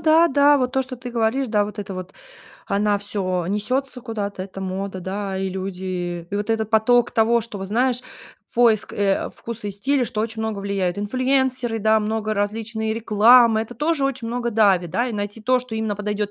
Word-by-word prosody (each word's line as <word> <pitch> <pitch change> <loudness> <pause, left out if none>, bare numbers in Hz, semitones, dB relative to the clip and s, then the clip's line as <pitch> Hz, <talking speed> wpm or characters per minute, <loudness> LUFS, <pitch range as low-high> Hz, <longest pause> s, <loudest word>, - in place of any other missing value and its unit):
да, 320 +2 +5
да, 285 +1 +5
вот 255 -1 -1
то, 265 - +2
что 260 0 -7
ты 250 0 -7
говоришь, 235 +3 0
да, 210 -2 +2
вот 210 +1 -8
это 200 -1 -5
вот. 185 -1 -7 0.6
Она 205 +1 +2
всё 190 -3 -2
несется 250 +6 -2
куда-то, 210 -5 -4
это 195 0 -8
мода, 190 0 -4
да, 195 +1 -4
и 190 0 -1
люди 185 -2 -4
и 205 - -2
вот 205 +2 -3
этот 220 -1 0
поток 235 +2 +4
того, 230 +1 +3
что 215 -2 -7
вот, 195 - -5
знаешь, 245 +3 +1 0.5
поиск, 230 -3 +3
э, 200 -1 0
вкуса 230 -2 -6
и - - -2
стиля, 260 +6 +1
что 215 - -3
очень 225 0 -3
много 220 -3 -3
влияют. 195 -2 -1
Инфлюэнсеры, 255 +1 0
да, 220 +1 +4
много 215 0 -1
различной 220 +2 -2
рекламы- 225 +1 +5
это 240 +2 -9
тоже 300 -2 0
очень 260 -4 -2
много 240 0 -2
давит, 195 -6 +3
да, 245 +2 0
и - - -5
найти 205 +1 -4
то, 255 +2 +3
что 250 -2 -7
именно 220 -2 -2
подойдет 210 0 -2
220 Hz, 200 wpm, -22 LUFS, 200-245 Hz, 0.6 s, да